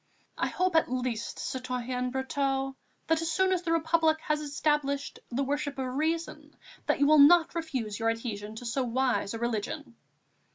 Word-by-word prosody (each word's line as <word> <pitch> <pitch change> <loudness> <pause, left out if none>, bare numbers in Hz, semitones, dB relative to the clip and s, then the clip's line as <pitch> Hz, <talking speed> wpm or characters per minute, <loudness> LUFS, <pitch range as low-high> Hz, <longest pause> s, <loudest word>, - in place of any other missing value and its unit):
I - - +1
hope, 365 -2 0
at 320 - +3
least, 250 -3 -2
citoyen 250 -1 -3
Brotteaux, 270 0 -1 0.3
that, 325 0 +2
as 330 0 -1
soon 375 +1 +3
as 360 - 0
the 340 -2 -2
Republic 320 -1 +3
has 300 0 -1
established 290 -1 -1
the 255 +3 -1
worship 285 +1 -2
of 265 - -2
Reason, 320 +4 -2 0.4
you 285 - +3
will 305 +1 +6
not 330 +4 +7
refuse 260 -11 -3
your 225 0 +2
adhesion 220 -2 -4
to 245 - -8
so 235 +3 -1
wise 245 -3 0
a - - -3
religion!" 235 +4 -3
275 Hz, 165 wpm, -29 LUFS, 245-315 Hz, 0.4 s, not